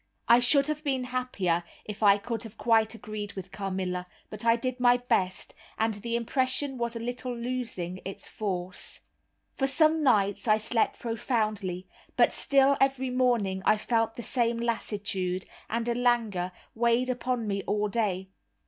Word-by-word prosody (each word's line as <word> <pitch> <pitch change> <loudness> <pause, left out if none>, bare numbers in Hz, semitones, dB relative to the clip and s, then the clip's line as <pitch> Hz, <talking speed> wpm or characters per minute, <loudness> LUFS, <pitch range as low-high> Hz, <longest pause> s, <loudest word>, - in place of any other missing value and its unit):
I 235 - +7
should 275 +3 +5
have 305 +1 -3
been 265 -4 0
happier 250 -9 -1 0.2
if 210 0 -7
I 200 -1 +6
could 225 +1 -4
have 225 -2 -9
quite 225 -1 +2
agreed 215 -1 -6
with 190 -2 -8
Carmilla, 185 -2 -3 0.2
but 215 0 -8
I 230 0 +5
did 255 +1 -3
my 245 0 +5
best, 190 -7 -1 0.2
and 225 0 +1
the 230 +3 -3
impression 260 +3 0
was 235 0 -2
a - - -3
little 245 +1 -4
losing 235 -7 -4
its 195 - -7
force. 185 -4 -5 0.5
For 270 - 0
some 310 +3 +3
nights 205 -6 +2
I 215 0 +5
slept 225 +1 0
profoundly; 215 -6 -2 0.3
but - - +5
still 275 0 +3
every 265 -1 +2
morning 235 -7 +1
I 215 - +4
felt 225 +1 0
the 240 - -6
same 235 -2 +1
lassitude, 200 -5 -2 0.2
and 230 +1 -1
a 240 - +2
languor 230 -7 +1 0.2
weighed 235 +2 +2
upon 250 -1 -2
me 200 -1 -1
all 210 0 +1
day. 195 -3 -1
230 Hz, 160 wpm, -28 LUFS, 200-250 Hz, 0.5 s, I